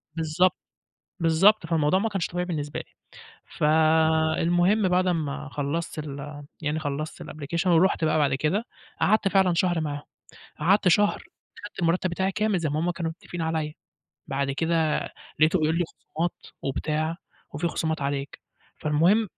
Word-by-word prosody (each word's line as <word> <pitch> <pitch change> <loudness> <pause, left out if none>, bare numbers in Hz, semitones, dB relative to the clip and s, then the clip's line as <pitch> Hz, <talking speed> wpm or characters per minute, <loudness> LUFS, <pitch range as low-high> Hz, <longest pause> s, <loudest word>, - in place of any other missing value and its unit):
بالضبط. 165 +3 +2 0.6
بالضبط، 170 +4 +4
فالموضوع 165 +2 +2
ما 225 +2 0
كانش 195 -4 -1
طبيعي 180 0 -3
بالنسبة 150 -4 -3
لي. - - -12 0.6
فالمهم 160 +5 +3
بعد 185 +1 +2
أمّا 150 -4 -2
خلّصت 150 +3 -3
ال 145 0 -7 0.2
يعني 150 +1 -1
خلّصت 155 +1 -4
الapplication 170 +5 -3
ورُحت 170 0 +3
بقى 155 0 +2
بعد 145 -3 +2
كده، 175 - 0 0.4
قعدت 215 0 +3
فعلًا 190 -2 +3
شهر 175 -1 +1
معاهم. 145 -1 -3 0.6
قعدت 190 +5 +4
شهر 205 +4 +3
كنت - - -19
خدت - - -9
المرتّب 175 +2 +1
بتاعي 190 +3 -1
كامل 210 -1 +1
زي 160 -3 -1
ما 150 +2 -1
هُم 175 +1 +1
كانوا 170 -1 -3
متفقين 170 0 -7
عليّا، 160 -1 -1 0.5
بعد 140 0 -1
كده 160 +2 +1 0.4
لقيته 160 +4 +4
بيقول 155 +2 +1
لي 175 - +2
خصومات 165 +1 -4 0.3
وبتاع، 155 +4 -1 0.4
وفي 165 +4 -1
خصومات 160 -3 -2
عليك. 140 0 -3 0.4
فالمهم 175 +9 +3
160 Hz, 150 wpm, -26 LUFS, 150-180 Hz, 0.6 s, بالضبط